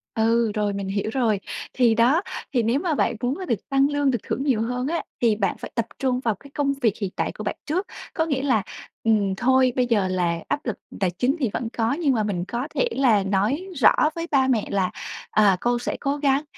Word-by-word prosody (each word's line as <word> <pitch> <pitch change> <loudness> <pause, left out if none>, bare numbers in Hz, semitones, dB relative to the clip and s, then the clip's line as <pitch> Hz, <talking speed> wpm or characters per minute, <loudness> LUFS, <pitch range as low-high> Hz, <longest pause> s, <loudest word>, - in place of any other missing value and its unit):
Ừ, 230 0 +2
rồi 205 -1 0
mình 200 -1 -4
hiểu 200 +2 -1
rồi. 230 -6 +1 0.3
Thì 240 -3 +3
đó, 250 +9 +4 0.3
thì 245 -3 +2
nếu 235 +6 +2
mà 335 -3 0
bạn - - +1
muốn 255 +4 0
được 230 - 0
tăng 275 0 +3
lương, 290 -2 +2
được 240 - +1
thưởng 270 - -2
nhiều 255 -6 +1
hơn 250 +3 -2
á 335 +1 -1 0.2
thì 230 -3 +4
bạn 200 -3 -1
phải - - -8
tập 230 - 0
trung 255 -2 +1
vào 230 -4 0
cái 280 - -14
công 280 -1 0
việc 225 -4 +3
hiện 200 - -1
tại - - -1
của - - -8
bạn - - -2
trước. 355 +6 -1 0.3
Có 320 - +1
nghĩa 280 -5 -1
là, 235 -8 +2 0.4
ừm, 210 -4 +2
thôi 255 +2 +3
bây 250 - +2
giờ 215 -6 +2
là 175 -2 0
áp 290 0 -2
lực 230 - -1 0.2
tài 190 - +2
chính 260 +4 +2
thì 255 -7 +1
vẫn 235 - -2
có, 230 +2 +2
nhưng 295 -3 +1
mà 220 -3 +1
mình 180 -4 -2
có 245 +4 -3
thể - - +2
là 230 - +3
nói 210 - 0
rõ 255 -6 +6 0.2
với 335 0 -4
ba 265 -2 +4
mẹ 235 -5 +1
là, 190 -2 +1 0.4
à, 205 -3 +4
con 240 0 +1
sẽ - - -3
cố 280 +1 -1
gắng, 280 0 +2
240 Hz, 240 wpm, -24 LUFS, 215-275 Hz, 0.4 s, rõ